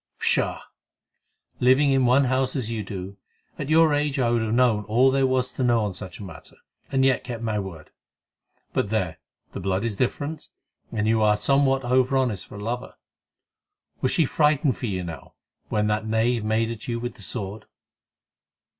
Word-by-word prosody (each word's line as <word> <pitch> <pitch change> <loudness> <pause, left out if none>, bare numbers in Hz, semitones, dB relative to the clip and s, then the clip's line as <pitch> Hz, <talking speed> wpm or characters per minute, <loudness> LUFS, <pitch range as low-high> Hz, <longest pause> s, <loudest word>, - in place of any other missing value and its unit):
"Pshaw! - - 0 1.0
Living 130 +3 +4
in 135 -2 +3
one 130 +3 +5
house 130 +1 0
as 120 -5 -2
you 115 -2 -2
do, 100 0 -7 0.4
at 140 - -4
your 160 -1 +5
age 145 -1 0
I 120 -3 +2
would 120 -1 +2
have 110 -1 -1
known 115 -3 +3
all 120 +5 +4
there 135 0 +2
was 130 -1 0
to 130 - -2
know 120 -3 +3
on 100 - -3
such 90 -1 -9
a - - -9
matter, 95 - -11 0.4
and 135 -1 +3
yet 130 -1 +2
kept 120 -2 -6
my 110 -2 -1
word. 85 -6 -8 0.8
But - - 0
there, 95 -7 -1 0.3
the - - -6
blood 95 +2 -1
is 115 -3 -2
different, 145 +7 -3 0.4
and 110 -1 -1
you 110 0 +3
are 105 -1 +4
somewhat 135 +4 +2
over 130 +2 +3
honest 120 -8 -1
for - - -11
a 100 - -7
lover. 120 +3 -4 1.1
Was 130 - +1
she 165 - +3
frightened 150 -2 +2
for 120 - -4
you, 95 -3 -2
now, 80 -5 -9 0.3
when 105 0 +1
that 105 +1 0
knave 115 +1 +1
made 110 +1 +1
at 115 -2 -8
you 115 -1 -2
with 120 +1 -4
the - - -17
sword?" 105 -2 -5
120 Hz, 190 wpm, -24 LUFS, 105-130 Hz, 1.1 s, one